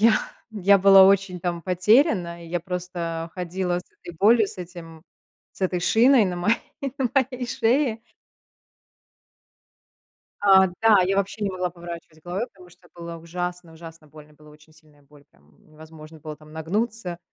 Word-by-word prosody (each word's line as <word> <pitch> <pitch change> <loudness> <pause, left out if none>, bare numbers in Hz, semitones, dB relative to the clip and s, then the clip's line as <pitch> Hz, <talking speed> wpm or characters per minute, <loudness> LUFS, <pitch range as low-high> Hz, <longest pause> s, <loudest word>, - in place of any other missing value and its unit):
я 225 +1 +6 0.4
я 200 -1 +4
была 195 0 +8
очень 195 -2 +2
там 170 -1 -3
потеряна. 185 - +2
И 165 - -12
я 175 +1 -2
просто 170 -2 -5
ходила 180 0 -2
с 180 - -10 0.2
этой 175 - -10
болью, 215 +4 +4
с 195 - -10
этим 170 -3 -10 0.5
с - - -20
этой 185 -1 -1
шиной 235 +6 +4
на 180 -2 -3
мо 175 +4 -3 0.5
на 255 -3 0
моей 260 -2 0
шее. 240 0 0 2.4
А, 190 -2 +6
да. 220 -4 +5
Я 190 +2 0
вообще 200 +2 -2
не 200 - -1
могла 180 -1 -3
поворачивать 170 -2 -10
головой, 180 +7 -3
потому 180 -4 -18
что 180 0 -22
было 170 -1 -8
ужасно 175 +1 -6
ужасно 165 -1 -13
больно. 150 0 -16
Была 150 0 -18
очень 155 +1 -20
сильная 155 -2 -24
боль, 145 0 -21
прям 75 +1 -28 0.2
невозможно 155 0 -14
было 155 0 -8
там 155 0 -17
нагнуться, 185 +3 -3
180 Hz, 160 wpm, -23 LUFS, 165-200 Hz, 2.4 s, была